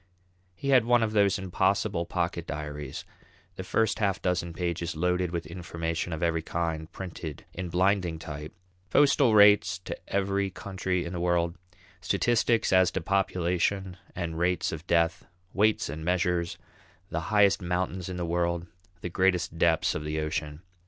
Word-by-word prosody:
He 140 Hz, -, -4 dB
had 130 Hz, -4 st, +6 dB
one 120 Hz, 0 st, +3 dB
of 110 Hz, -, 0 dB
those 100 Hz, -1 st, +3 dB
impossible 95 Hz, -2 st, 0 dB
pocket 85 Hz, -1 st, -2 dB
diaries, 75 Hz, -2 st, -5 dB, 0.5 s
the -, -, -5 dB
first 110 Hz, -1 st, +1 dB
half 100 Hz, -3 st, +1 dB
dozen 90 Hz, -1 st, -1 dB
pages 85 Hz, -1 st, -3 dB
loaded 90 Hz, +2 st, +1 dB
with 85 Hz, -1 st, -3 dB
information 85 Hz, 0 st, -4 dB
of 80 Hz, +1 st, -3 dB
every 85 Hz, -1 st, +1 dB
kind 80 Hz, 0 st, -3 dB
printed 85 Hz, -6 st, -7 dB
in 90 Hz, 0 st, -5 dB
blinding 90 Hz, -1 st, +1 dB
type, 75 Hz, -1 st, -7 dB, 0.4 s
postal 140 Hz, -1 st, +4 dB
rates 100 Hz, -1 st, +6 dB
to 90 Hz, -, -6 dB, 0.2 s
every 100 Hz, 0 st, 0 dB
country 95 Hz, -1 st, -3 dB
in 85 Hz, -, -5 dB
the 90 Hz, -, -3 dB
world, 85 Hz, -1 st, +1 dB, 0.5 s
statistics 110 Hz, +4 st, +2 dB
as 95 Hz, -1 st, +5 dB
to 95 Hz, -, -2 dB
population 95 Hz, 0 st, 0 dB, 0.2 s
and 85 Hz, -3 st, -3 dB
rates 90 Hz, 0 st, +1 dB
of 80 Hz, +2 st, -7 dB
death, 85 Hz, 0 st, +1 dB, 0.3 s
weights 110 Hz, +1 st, +2 dB
and 75 Hz, +3 st, -6 dB
measures, 90 Hz, 0 st, 0 dB, 0.5 s
the 80 Hz, -, -1 dB
highest 105 Hz, -1 st, +4 dB
mountains 90 Hz, +1 st, -2 dB
in 90 Hz, -, -5 dB
the 90 Hz, -, -2 dB
world, 85 Hz, 0 st, 0 dB, 0.4 s
the -, -, -3 dB
greatest 90 Hz, -2 st, +1 dB
depths 85 Hz, -2 st, +3 dB
of 75 Hz, -, -4 dB
the 75 Hz, +1 st, -2 dB
ocean. 75 Hz, +1 st, -3 dB
90 Hz, 155 wpm, -28 LUFS, 85-95 Hz, 0.5 s, had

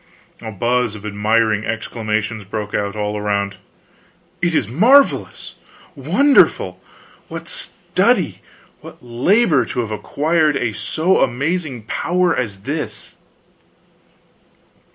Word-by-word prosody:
A 110 Hz, -, -6 dB
buzz 120 Hz, +1 st, 0 dB
of 105 Hz, 0 st, -10 dB
admiring 110 Hz, +1 st, +1 dB
exclamations 110 Hz, -1 st, -3 dB
broke 105 Hz, +1 st, -5 dB
out, 100 Hz, 0 st, -2 dB
all 105 Hz, 0 st, -2 dB
around: 100 Hz, -1 st, -1 dB, 0.8 s
"It 170 Hz, -2 st, +1 dB
is 120 Hz, -, +1 dB
marvelous!" 240 Hz, -, +3 dB, 0.4 s
"Wonderful!" 165 Hz, -, +3 dB, 0.5 s
"What -, -, -8 dB
study, -, -, 0 dB, 0.4 s
what -, -, -13 dB
labor, 145 Hz, -, +3 dB
to 125 Hz, -, -4 dB
have 110 Hz, -2 st, -5 dB
acquired 150 Hz, -, +1 dB
a 120 Hz, -4 st, -1 dB
so 165 Hz, -, +1 dB
amazing 135 Hz, 0 st, -2 dB
power 175 Hz, +10 st, 0 dB
as 100 Hz, -6 st, -3 dB
this!" 145 Hz, +8 st, -5 dB
115 Hz, 105 wpm, -19 LUFS, 105-155 Hz, 0.8 s, marvelous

